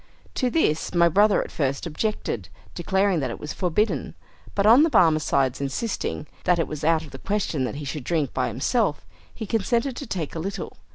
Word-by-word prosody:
To 255 - 0
this 175 - 0
my 170 0 +6
brother 205 +5 +4
at - - -10
first 140 0 -1
objected, 155 - -3 0.2
declaring 190 +1 +1
that 135 - -1
it - - -6
was 150 - -5
forbidden; 190 +4 -1 0.4
but 200 - +2
on 230 +6 +8
the 325 - +4
Barmecide 145 - +3
insisting 150 +3 -3 0.2
that 180 -1 +4
it 165 - 0
was 155 -1 -6
out 160 0 +3
of 145 - -13
the 135 - -9
question 175 -9 -1
that 125 - -4
he 145 0 -6
should 140 0 -4
drink 155 -3 -1
by - - 0
himself, 150 - 0 0.3
he 220 - -6
consented 235 +5 0
to 280 - -6
take 170 -8 -3
a 165 - -4
little. 195 +4 -5
170 Hz, 195 wpm, -24 LUFS, 150-210 Hz, 0.4 s, on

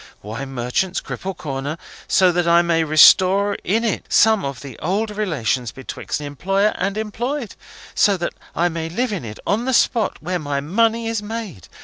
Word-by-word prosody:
Wine 115 +7 -6
Merchants, 125 +10 -1
Cripple 190 -1 -6
Corner, 140 +2 -4 0.3
so 185 -1 +4
that 175 0 0
I 170 +1 +5
may 165 -1 +2
restore 185 +6 +6
in 220 +6 +1
it 225 -4 -2
some 220 -2 +4
of 140 -2 -5
the 135 -4 -10
old 210 +6 -1
relations 140 - -1
betwixt 130 +2 -5
employer 195 +9 0
and 195 +2 -1
employed! 235 +4 -3 0.4
So 200 -2 +3
that 175 - -3 0.2
I 175 - +2
may 165 -1 -4
live 240 +6 -1
in 185 - -4
it 105 -2 -7
on 220 +4 0
the 260 - 0
spot 230 -3 +2
where 180 +4 -3
my 145 -2 -2
money 225 +9 +1
is 225 -2 -1
made! 210 - -7
180 Hz, 175 wpm, -20 LUFS, 145-215 Hz, 0.4 s, restore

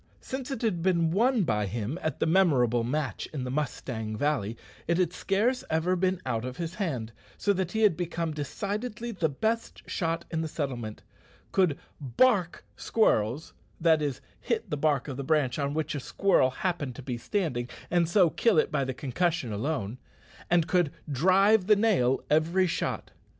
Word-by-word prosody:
Since 265 0 -5
it 265 -4 -4
had 195 -7 0
been 170 -2 +2
won 230 +4 +3
by 105 - 0
him 115 - -3
at 155 - -2
the - - +2
memorable 140 -10 +3
match 145 +4 -2
in 145 -5 -4
the 125 - -4
Mustang 125 -6 -3
Valley, 120 -6 0 0.3
it 170 - +2
had 180 -2 +1
scarce 220 +8 0
ever 165 +3 +1
been 185 0 +1
out 115 -3 -1
of 125 +1 -5
his 170 -1 -4
hand, 135 - -3 0.3
so 205 - +2
that 185 -2 -2
he 220 - 0
had 205 -6 +5
become 170 -2 -2
decidedly 210 - -4
the 175 -7 0
best 220 +11 -2
shot 165 -1 -2
in 160 -1 -1
the 160 - -2
settlement, 125 -8 -4 0.5
could 180 -7 +2 0.2
"bark" 175 - +2
squirrels 130 - +1 0.3
(that 160 -2 +4
is, 145 -4 -2 0.2
hit - - -2
the - - +1
bark 145 -2 +1
of 135 -3 -5
the 140 - -3
branch 145 -3 +1
on 140 0 -1
which 155 -1 -1
a 145 - -2
squirrel 180 -1 +2
happened 145 -3 -3
to 135 - -9
be 125 -1 -3
standing, 125 - -2 0.2
and 170 -2 +2
so 175 -3 +4
kill 230 -7 +2
it - - +3
by 140 -2 +1
the 130 -1 -3
concussion 140 -1 -1
alone), 115 -1 -2 0.5
and 170 -2 +4
could 175 -6 +2 0.2
"drive 190 - +4
the 215 - +7
nail" 190 - +2
every 165 +5 +3
shot. 175 - -2
160 Hz, 180 wpm, -28 LUFS, 130-185 Hz, 0.5 s, the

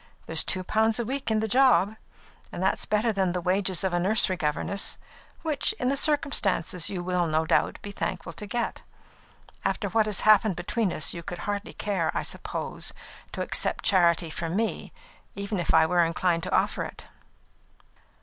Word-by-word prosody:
There's 160 -1 +5
two 185 - 0
pounds 220 +4 +1
a 235 - -1
week 265 +2 -3
in 220 -1 +1
the 220 - -1
job, 230 -3 +4 0.6
and 180 - -4
that's 190 - 0
better 215 +2 +1
than 190 -3 0
the 180 - -1
wages 185 +1 0
of 190 -2 0
a 175 - +2
nursery 190 +1 +3
governess, 165 +5 -1 0.5
which, 315 +4 0
in 255 -12 -1
the 275 - +1
circumstances, 220 - 0
you 180 -3 -4
will, 180 -1 0
no 160 0 +1
doubt, - - +1
be 205 - -6
thankful 175 -3 -4
to 210 - -8
get. 240 +3 -2 0.8
After - - -1
what 220 -1 +2
has 210 - +1
passed 215 -2 +5
between 190 +3 -1
us, 155 - 0
you 170 - -6
would 175 - -6
hardly 205 0 -3
care, 190 -6 -1
I - - -1
suppose, - - -4 0.4
to - - -4
accept - - 0
charity 170 -3 +3
from 165 +2 -4
me, 225 +2 -2 0.4
even 200 0 -3
if 175 - 0
I 160 0 +5
were 175 +1 +3
inclined 165 +1 0
to - - -5
offer - - +1
it." - - -9
195 Hz, 180 wpm, -26 LUFS, 175-220 Hz, 0.8 s, There's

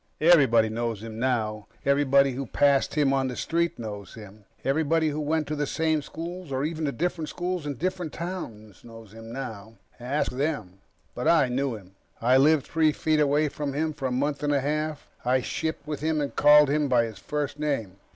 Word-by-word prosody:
Everybody 135 -9 +5
knows 115 -1 -3
him 110 -1 -7
now. 110 -4 -1 0.2
Everybody 140 0 +4
who 135 +1 -5
passed 140 +4 +2
him 145 -3 +3
on 135 -1 +1
the 125 - -4
street 170 +4 -1
knows 105 -4 -7
him. 105 -2 -13 0.2
Everybody 160 +3 +2
who 150 +1 -3
went 155 +1 0
to 150 - -3
the 145 -1 -1
same 160 0 0
schools, 170 +2 -7
or 130 +1 -1
even 160 0 -3
to 140 - 0
different 165 +3 -2
schools 180 -3 -3
in 145 - -3
different 180 +2 -3
towns, 115 - -7
knows 115 -3 -13
him 115 0 -10
now. 115 -4 -7 0.2
Ask 130 +5 -1
them. 125 - -3 0.3
But - - -3
I 150 -6 +4
knew 130 0 -1
him. 95 -3 -13 0.3
I 125 +3 +4
lived 145 +1 +4
three 160 -1 +2
feet 155 +1 0
away 150 +1 +3
from 145 -1 -4
him 155 +2 -1
for 135 -2 -3
a - - -3
month 140 +3 -1
and 145 0 +1
a 140 - +2
half. 150 +1 -2 0.2
I 130 +1 +2
shipped 160 +2 -3
with 150 -1 -4
him 155 0 0
and 145 -1 -3
called 150 0 +7
him 150 0 +1
by 125 -3 +3
his 110 -4 -6
first 150 +3 -3
name. 125 -11 -2
140 Hz, 200 wpm, -26 LUFS, 120-155 Hz, 0.3 s, called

